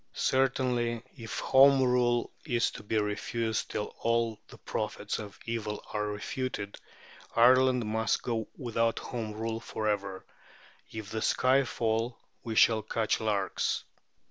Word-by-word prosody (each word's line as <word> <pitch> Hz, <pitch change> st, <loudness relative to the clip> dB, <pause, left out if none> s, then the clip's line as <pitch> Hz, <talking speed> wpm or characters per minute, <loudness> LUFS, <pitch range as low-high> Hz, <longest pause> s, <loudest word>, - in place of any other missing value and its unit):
Certainly, 125 Hz, -3 st, +1 dB
if 115 Hz, -5 st, -6 dB
Home 135 Hz, 0 st, +6 dB
Rule 125 Hz, -1 st, +2 dB
is 120 Hz, -5 st, +1 dB
to -, -, -9 dB
be 105 Hz, +1 st, -1 dB
refused 110 Hz, +1 st, -1 dB
till 105 Hz, -, -3 dB
all 115 Hz, -1 st, +1 dB
the -, -, -13 dB
prophets -, -, -3 dB
of 105 Hz, -2 st, -8 dB
evil 110 Hz, -2 st, -3 dB
are 105 Hz, -1 st, 0 dB
refuted, 105 Hz, 0 st, -4 dB, 0.6 s
Ireland 125 Hz, 0 st, +5 dB
must 110 Hz, +1 st, 0 dB
go 115 Hz, -3 st, -2 dB
without 115 Hz, -3 st, 0 dB
Home 110 Hz, -3 st, -4 dB
Rule 115 Hz, +1 st, -3 dB
for 110 Hz, -1 st, -4 dB
ever. 100 Hz, -2 st, -2 dB, 0.7 s
"If 110 Hz, -2 st, -7 dB
the 110 Hz, -, -2 dB
sky 130 Hz, +4 st, +3 dB
fall, 115 Hz, 0 st, -1 dB, 0.3 s
we 115 Hz, -2 st, -4 dB
shall 110 Hz, 0 st, +5 dB
catch 110 Hz, +1 st, 0 dB
larks." 105 Hz, -3 st, 0 dB
115 Hz, 135 wpm, -30 LUFS, 110-125 Hz, 0.7 s, Home